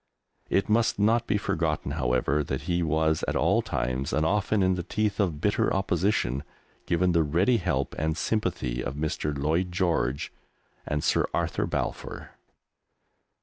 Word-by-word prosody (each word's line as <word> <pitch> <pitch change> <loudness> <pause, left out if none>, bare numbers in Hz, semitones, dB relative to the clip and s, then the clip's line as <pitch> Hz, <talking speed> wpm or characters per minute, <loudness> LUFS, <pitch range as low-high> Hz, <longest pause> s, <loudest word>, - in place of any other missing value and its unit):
It 95 - +2
must 115 +2 +2
not 115 +3 +2
be 105 - +2
forgotten, 80 -7 -1
however 65 +1 +1
that 65 - -3
he 90 -1 0
was 80 -1 +1
at - - -1
all - - +3
times, 65 +3 -2
and 80 - +2
often 105 +2 +1
in 95 0 +3
the 90 - -2
teeth 105 +3 -1
of 85 -7 0
bitter 100 +5 +1
opposition, 90 - 0 0.4
given 90 +1 +2
the 85 -1 +3
ready 85 - +2
help 85 - -1
and 80 +1 0
sympathy 65 - -1
of 70 - -4
Mr. 75 -1 -2
Lloyd 80 +6 0
George 85 -8 0 0.5
and 75 -1 -1
Sir - - +2
Arthur - - -1
Balfour. - - -4
80 Hz, 150 wpm, -27 LUFS, 75-95 Hz, 0.5 s, all